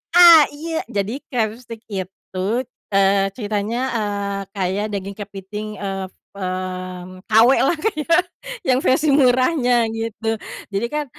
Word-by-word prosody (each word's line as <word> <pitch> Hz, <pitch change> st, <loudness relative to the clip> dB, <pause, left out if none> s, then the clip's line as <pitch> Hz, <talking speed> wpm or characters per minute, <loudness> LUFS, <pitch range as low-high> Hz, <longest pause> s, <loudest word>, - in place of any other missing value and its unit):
Ah, 340 Hz, -3 st, +10 dB
iya 320 Hz, +2 st, -4 dB
jadi 200 Hz, -1 st, -1 dB, 0.2 s
crabstick 230 Hz, -1 st, -3 dB
itu, 190 Hz, -2 st, -7 dB, 0.5 s
eee, 195 Hz, 0 st, +3 dB
ceritanya 210 Hz, 0 st, -2 dB, 0.2 s
eee, 200 Hz, -2 st, -2 dB
kayak 195 Hz, +2 st, -1 dB
daging 200 Hz, 0 st, -4 dB
kepiting, 205 Hz, +1 st, -7 dB
eee, 195 Hz, -1 st, -3 dB, 0.3 s
mmm, 185 Hz, -1 st, -5 dB
KW 225 Hz, +3 st, +7 dB, 0.2 s
lah 335 Hz, -, +1 dB
kayak 335 Hz, -3 st, +2 dB, 0.5 s
yang 255 Hz, -1 st, +4 dB
versi 285 Hz, +4 st, +2 dB
murahnya 250 Hz, -2 st, +3 dB
gitu. 225 Hz, 0 st, -2 dB, 0.4 s
Jadi 200 Hz, +4 st, 0 dB
kan, 300 Hz, 0 st, -1 dB
210 Hz, 120 wpm, -21 LUFS, 195-255 Hz, 0.5 s, Ah